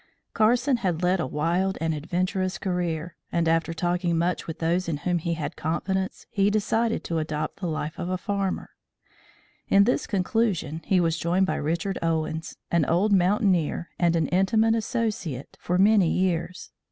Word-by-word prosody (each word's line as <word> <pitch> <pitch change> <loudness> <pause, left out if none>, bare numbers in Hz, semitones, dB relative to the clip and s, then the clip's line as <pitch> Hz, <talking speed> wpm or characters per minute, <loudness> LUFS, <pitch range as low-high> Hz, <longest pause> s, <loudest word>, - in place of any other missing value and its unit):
Carson 245 +4 +3
had 180 -6 -1
led 180 +1 +2
a 160 - -1
wild 170 +7 0
and 165 0 0
adventurous 185 +4 -1
career, 175 -3 -2 0.2
and, 170 -1 +1
after 165 +1 +2
talking 175 +1 0
much 175 +2 -1
with 160 - -5
those 170 +2 0
in 155 - -1
whom 175 +4 0
he 170 +1 -2
had 160 - -4
confidence, 190 +4 -2
he 200 -1 +2
decided 220 +2 0
to 165 -1 -1
adopt 155 0 -3
the 185 - -2
life 155 -1 -4
of 175 - -3
a 185 - 0
farmer. 200 0 -2 1.0
In 200 - +6
this 245 - +1
conclusion 185 -5 0
he 190 - +3
was 165 -1 +1
joined 180 +3 +2
by - - -1
Richard 170 +5 -2
Owens, 160 -1 -2
an 170 -2 +3
old 190 +7 +2
mountaineer 185 -3 +2
and 170 -1 +3
an 160 -3 +1
intimate 220 +5 +3
associate 220 - -2
for 180 - 0
many 200 -2 +5
years. 180 0 -1
180 Hz, 165 wpm, -25 LUFS, 165-195 Hz, 1.0 s, In